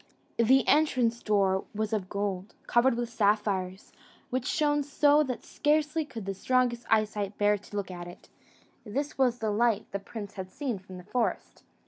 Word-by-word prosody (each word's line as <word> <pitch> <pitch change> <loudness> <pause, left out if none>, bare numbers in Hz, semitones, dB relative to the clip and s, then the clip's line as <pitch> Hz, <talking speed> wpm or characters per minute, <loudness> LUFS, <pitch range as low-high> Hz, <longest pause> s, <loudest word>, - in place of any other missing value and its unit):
The 260 +4 +4
entrance 255 -6 +3
door 195 -3 +2
was 215 +1 -2
of 195 -4 -2
gold, 200 -1 -3
covered 240 +1 +3
with 240 0 -2
sapphires, 205 -4 0 0.4
which 255 0 -1
shone 295 -1 +2
so 290 +1 +4
that 255 -5 -3
scarcely 300 +1 +1
could 225 -8 -8
the 195 - -2
strongest 245 +3 0
eyesight 210 -2 +1
bear 205 0 +3
to 205 - -12
look 200 -2 -3
at 175 -1 -7
it: 175 - -12 0.6
this 275 +7 -4
was 250 -2 +3
the 220 -3 -1
light 225 0 +2
the 200 - -2
prince 205 0 -8
had 185 -1 -6
seen 245 0 -3
from 185 -1 -11
the 180 - -10
forest. 230 +5 -2
220 Hz, 170 wpm, -29 LUFS, 200-255 Hz, 0.6 s, The